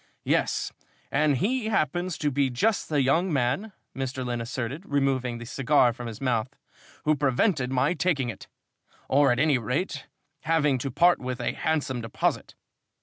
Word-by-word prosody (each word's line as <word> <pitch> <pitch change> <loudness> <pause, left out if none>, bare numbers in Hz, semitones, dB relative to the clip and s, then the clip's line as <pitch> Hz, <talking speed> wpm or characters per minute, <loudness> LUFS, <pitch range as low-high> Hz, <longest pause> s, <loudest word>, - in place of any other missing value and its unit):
"Yes, - - 0 0.4
and 145 -1 +2
he 230 - 0
happens 175 -3 0
to 145 -2 0
be 140 0 +1
just 205 - 0
the 145 -3 +2
young 165 +8 +2
man," 140 - 0 0.2
Mr. 130 -1 -3
Lynn 120 -1 -2
asserted, 130 +6 -4
removing 135 -4 0
the 120 - -8
cigar 130 0 +3
from 120 +1 -7
his 110 -2 -7
mouth, 125 0 -1 0.5
"who 155 0 +4
prevented 135 - +1
my 135 +5 +2
taking 155 -6 0
it, 105 - -8 0.6
or 140 -1 +4
at 120 - +1
any 145 -1 +3
rate 140 - -3 0.4
having 150 -4 +2
to 135 - -3
part 170 +7 +4
with 125 0 -4
a 120 - -1
handsome 150 -5 -1
deposit. 115 -1 -2
135 Hz, 160 wpm, -26 LUFS, 125-155 Hz, 0.6 s, who